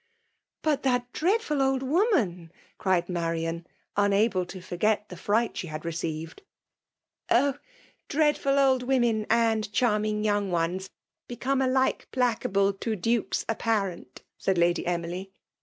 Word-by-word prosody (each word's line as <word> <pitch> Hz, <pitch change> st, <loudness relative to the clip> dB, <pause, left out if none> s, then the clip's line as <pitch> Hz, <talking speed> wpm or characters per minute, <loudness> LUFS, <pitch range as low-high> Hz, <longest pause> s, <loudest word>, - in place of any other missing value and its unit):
" -, -, -54 dB
But 300 Hz, -3 st, +1 dB
that 245 Hz, -2 st, 0 dB
dreadful 345 Hz, -5 st, +1 dB
old 270 Hz, 0 st, +1 dB
woman 260 Hz, -, +1 dB
!'* -, -, -34 dB
cried 185 Hz, -3 st, +1 dB
Ma 175 Hz, -2 st, -2 dB
rian, 165 Hz, 0 st, -3 dB, 0.3 s
unable 200 Hz, -2 st, +2 dB
to 185 Hz, -, -8 dB
forget 205 Hz, +4 st, 0 dB
the -, -, -8 dB
fright 225 Hz, +3 st, 0 dB
she 180 Hz, -, -4 dB
had 155 Hz, 0 st, -6 dB
re 170 Hz, -, -1 dB
ceived. 160 Hz, 0 st, -5 dB, 0.5 s
" -, -, -63 dB
Oh! 280 Hz, +3 st, +3 dB, 0.5 s
dreadful 295 Hz, -2 st, +2 dB
old 265 Hz, -2 st, +4 dB
women 240 Hz, -4 st, +1 dB
and 225 Hz, -2 st, +2 dB
charming 215 Hz, -2 st, +1 dB
young 205 Hz, -2 st, +1 dB
ones, 175 Hz, +2 st, -1 dB, 0.4 s
become 260 Hz, +3 st, -1 dB
alike 260 Hz, 0 st, +1 dB
placable 200 Hz, -5 st, +1 dB
to 220 Hz, -2 st, -2 dB
IXikes 230 Hz, +4 st, 0 dB
apparent 200 Hz, -, -2 dB
!" -, -, -60 dB
said 190 Hz, -2 st, +1 dB
Lady 170 Hz, 0 st, +2 dB
Emily. 175 Hz, +2 st, -3 dB
215 Hz, 145 wpm, -27 LUFS, 180-255 Hz, 0.5 s, old